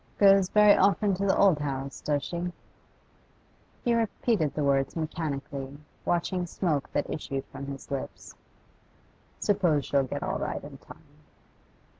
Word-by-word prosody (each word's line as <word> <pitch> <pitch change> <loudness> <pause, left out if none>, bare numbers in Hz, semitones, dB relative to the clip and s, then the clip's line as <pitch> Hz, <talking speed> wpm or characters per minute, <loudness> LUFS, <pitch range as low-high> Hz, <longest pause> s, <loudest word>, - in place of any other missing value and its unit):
'Goes 195 -2 +6
very 210 -1 +6
often 200 +1 +3
to 200 +2 -1
the 190 - +3
old 190 -7 +5
house, 140 -1 -4
does 145 -2 0
she?' 175 +1 -3 1.3
He 240 - +2
repeated 225 - 0
the 150 - 0
words 135 -1 +1
mechanically, 145 -4 -4 0.3
watching 175 +1 0
smoke 160 -5 -1
that - - -1
issued 135 -2 -4
from 140 - -7
his 140 0 -8
lips. 135 -1 -6 1.1
'Suppose 175 -9 +2
she'll 140 - +2
get 130 - -4
all - - -2
right - - -3
in - - -10
time. - - -15
160 Hz, 140 wpm, -28 LUFS, 140-195 Hz, 1.3 s, Goes